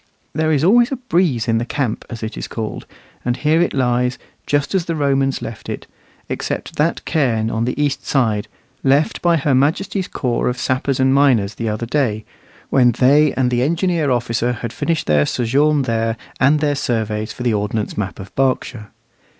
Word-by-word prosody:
There 155 Hz, +1 st, +1 dB
is 150 Hz, -1 st, +2 dB
always 235 Hz, -, +5 dB
a -, -, 0 dB
breeze 175 Hz, -, 0 dB
in 115 Hz, -1 st, +2 dB
the -, -, -1 dB
"camp," 125 Hz, -2 st, -2 dB
as 115 Hz, -2 st, -7 dB
it 110 Hz, -, -4 dB
is -, -, -5 dB
called; 110 Hz, -2 st, -5 dB, 0.4 s
and 120 Hz, 0 st, -1 dB
here 155 Hz, +2 st, +2 dB
it 175 Hz, -, +1 dB
lies, 125 Hz, -1 st, +1 dB, 0.3 s
just 145 Hz, +3 st, 0 dB
as 185 Hz, -4 st, +1 dB
the 165 Hz, -, -2 dB
Romans 135 Hz, -2 st, +1 dB
left 115 Hz, -, -7 dB
it, -, -, -5 dB, 0.4 s
except -, -, -4 dB
that 160 Hz, +3 st, 0 dB
cairn 115 Hz, -8 st, +1 dB
on 115 Hz, +1 st, -1 dB
the 125 Hz, -, -3 dB
east 145 Hz, -2 st, 0 dB
side, 110 Hz, -7 st, 0 dB, 0.4 s
left 140 Hz, +3 st, +2 dB
by 170 Hz, -1 st, +3 dB
her 145 Hz, -1 st, +1 dB
Majesty's 165 Hz, +8 st, +1 dB
corps 120 Hz, -3 st, -1 dB
of 125 Hz, -, -1 dB
sappers 130 Hz, +2 st, -1 dB
and 130 Hz, 0 st, +3 dB
miners 125 Hz, -8 st, +3 dB
the 115 Hz, +1 st, -3 dB
other 110 Hz, +2 st, -3 dB
day, 115 Hz, -5 st, -1 dB, 0.5 s
when 125 Hz, -3 st, +4 dB
they 140 Hz, +5 st, +4 dB
and 125 Hz, -2 st, +1 dB
the 120 Hz, 0 st, +1 dB
engineer 165 Hz, +1 st, +1 dB
officer 120 Hz, -1 st, 0 dB
had 115 Hz, 0 st, -6 dB
finished 165 Hz, -2 st, -1 dB
their 75 Hz, -1 st, +3 dB
sojourn 140 Hz, +5 st, +2 dB
there, 115 Hz, -1 st, -1 dB, 0.2 s
and 145 Hz, +4 st, +4 dB
their 145 Hz, -1 st, +2 dB
surveys 110 Hz, -5 st, -2 dB
for 125 Hz, -, -7 dB
the 120 Hz, -2 st, +2 dB
ordnance 105 Hz, +1 st, -2 dB
map 95 Hz, -4 st, -4 dB
of 95 Hz, 0 st, -10 dB
Berkshire. 130 Hz, -5 st, -1 dB
130 Hz, 190 wpm, -19 LUFS, 115-150 Hz, 0.5 s, always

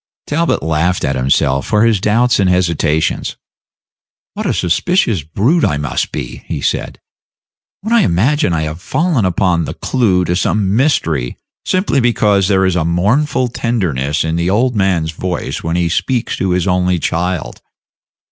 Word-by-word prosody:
Talbot 165 Hz, -, 0 dB
laughed 80 Hz, +3 st, 0 dB
at 70 Hz, -, -1 dB
himself 65 Hz, +1 st, +1 dB
for 105 Hz, 0 st, +2 dB
his 110 Hz, -5 st, +2 dB
doubts 115 Hz, +4 st, +2 dB
and 95 Hz, -2 st, +3 dB
hesitations. 85 Hz, -3 st, 0 dB, 1.0 s
"What -, -, -4 dB
a -, -, +1 dB
suspicious 105 Hz, -, +1 dB
brute 110 Hz, -, 0 dB
I 75 Hz, -, +1 dB
must 75 Hz, 0 st, -2 dB
be," -, -, -6 dB
he -, -, -3 dB
said, -, -, -2 dB, 0.8 s
"when 220 Hz, +4 st, -2 dB
I 235 Hz, -, +5 dB
imagine 120 Hz, -, +1 dB
I 80 Hz, -2 st, 0 dB
have 80 Hz, +2 st, -5 dB
fallen 155 Hz, -, 0 dB
upon 90 Hz, -2 st, +1 dB
the -, -, -6 dB
clew 95 Hz, -8 st, +1 dB
to 90 Hz, -, 0 dB
some 100 Hz, +2 st, 0 dB
mystery 85 Hz, -, 0 dB, 0.3 s
simply 185 Hz, -6 st, +1 dB
because 105 Hz, -5 st, +2 dB
there 95 Hz, -1 st, +2 dB
is 95 Hz, -2 st, +1 dB
a 90 Hz, -, +1 dB
mournful 110 Hz, -, +1 dB
tenderness 80 Hz, -, -1 dB
in 80 Hz, +1 st, -1 dB
the 85 Hz, +1 st, 0 dB
old 120 Hz, +5 st, +1 dB
man's 90 Hz, -6 st, +1 dB
voice 90 Hz, +2 st, -4 dB
when 80 Hz, +1 st, -2 dB
he 85 Hz, -1 st, +1 dB
speaks 120 Hz, +8 st, -1 dB
to 95 Hz, -, -1 dB
his 90 Hz, -1 st, 0 dB
only 90 Hz, -1 st, +1 dB
child! 85 Hz, +2 st, -2 dB
90 Hz, 160 wpm, -15 LUFS, 80-115 Hz, 1.0 s, I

